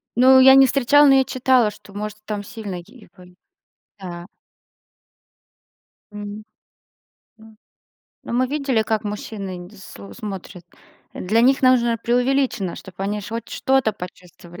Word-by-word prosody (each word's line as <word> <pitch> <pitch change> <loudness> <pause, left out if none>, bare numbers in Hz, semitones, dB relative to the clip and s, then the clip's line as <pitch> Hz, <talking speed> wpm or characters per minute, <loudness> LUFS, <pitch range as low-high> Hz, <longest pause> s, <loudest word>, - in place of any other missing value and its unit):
Ну 260 +2 +6
я 265 +1 +8
не 270 - +7
встречала, 285 +3 +4
но 270 - +6
я 265 - +4
читала, 255 -4 +2
что 205 -1 -17
может 210 +1 -6
там 210 -1 -4
сильный 200 -5 -7
и 220 +6 -18
бань. 180 -1 -17 0.6
Да. 175 -2 -8 1.9
Мгм. 205 +1 -8 1.0
М. 220 0 -17 0.7
Ну - - -8
мы 255 +1 +2
видели, 270 -4 0
как 220 0 -2
мужчины 205 -2 -6
нд 175 +3 -12
сл 100 - -12
смотрят, 190 - -8 0.5
для 215 +5 0
них 265 +3 +3
нужно 240 -2 +3
преувеличено, 245 -4 0
чтобы 190 0 -10
они 205 +1 -2
ж 200 - -9
хоть 230 +1 -6
что-то 265 -5 0
почувствовали. 180 -2 -12
215 Hz, 140 wpm, -21 LUFS, 195-255 Hz, 1.9 s, я